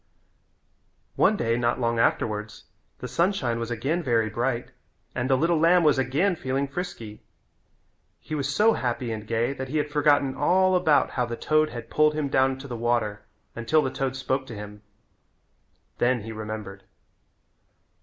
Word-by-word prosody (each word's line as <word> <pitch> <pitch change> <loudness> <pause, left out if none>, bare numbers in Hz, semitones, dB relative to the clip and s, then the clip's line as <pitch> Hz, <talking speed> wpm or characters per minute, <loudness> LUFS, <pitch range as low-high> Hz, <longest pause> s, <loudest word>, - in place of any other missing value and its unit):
One 215 - +3
day 115 -5 0
not 120 +1 0
long 115 -1 0
afterwards 105 -2 -1 0.3
the 125 - -6
sunshine 155 - 0
was 115 0 -4
again 135 +9 -1
very 115 -7 +1
bright 120 0 -2 0.4
and 125 +2 -2
the 130 - +4
little 165 +2 +2
lamb 170 +2 +5
was 150 -3 +4
again 150 +9 +1
feeling 135 -1 -2
frisky. 135 - -6 1.0
He 155 - -9
was 145 -2 -1
so 215 +10 +4
happy 120 -1 -2
and 110 -1 -6
gay 115 +4 0
that 130 -1 -6
he 155 - -1
had 150 0 -1
forgotten 145 -2 +3
all 185 +6 +3
about 155 -7 +3
how 125 - -1
the 120 0 -5
toad 155 0 +2
had 120 -1 -8
pulled 150 0 +3
him 150 -2 -1
down 130 0 +2
to 135 +1 -9
the 125 - -5
water 115 -3 -1 0.3
until 150 +7 +2
the 130 - -2
toad 135 -1 -2
spoke 130 0 -2
to 115 - -8
him. 105 0 -9 1.2
Then 120 -1 +2
he 110 - -7
remembered. 110 -3 -7
130 Hz, 165 wpm, -25 LUFS, 115-150 Hz, 1.2 s, lamb